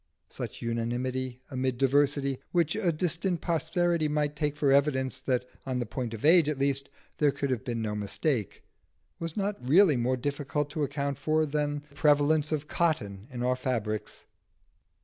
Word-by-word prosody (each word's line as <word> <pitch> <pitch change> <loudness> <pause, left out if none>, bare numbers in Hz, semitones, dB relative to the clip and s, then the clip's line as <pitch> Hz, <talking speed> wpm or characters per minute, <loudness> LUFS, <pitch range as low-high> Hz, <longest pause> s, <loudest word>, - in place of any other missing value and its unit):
Such - - -6
unanimity 125 +2 -2
amid 130 -1 -1
diversity, 140 0 +2
which 170 -3 +2
a 200 -5 +1
distant 170 +2 0
posterity 170 0 +1
might 150 0 0
take 150 -1 -1
for 145 -3 +3
evidence 130 -2 +2
that 125 -2 0 0.2
on 130 -2 -2
the 120 - -1
point 115 0 -4
of 110 - -5
age 165 -1 +6
at 150 - -1
least 140 0 0 0.3
there 150 - +5
could 140 0 -2
have 125 -2 -1
been 120 -3 -3
no 105 -1 -2
mistake, 105 - -2 0.6
was 165 +1 -5
not 205 -5 -2
really 155 +3 +5
more 125 +2 +1
difficult 145 +2 -2
to 155 - -3
account 140 -1 -2
for 155 +2 +2
than 145 0 -1
the - - -21
prevalence 150 +1 +3
of 150 -1 -2
cotton 115 - -1
in 125 -2 -5
our 125 +1 +2
fabrics. 115 -5 -3
140 Hz, 170 wpm, -29 LUFS, 125-155 Hz, 0.6 s, age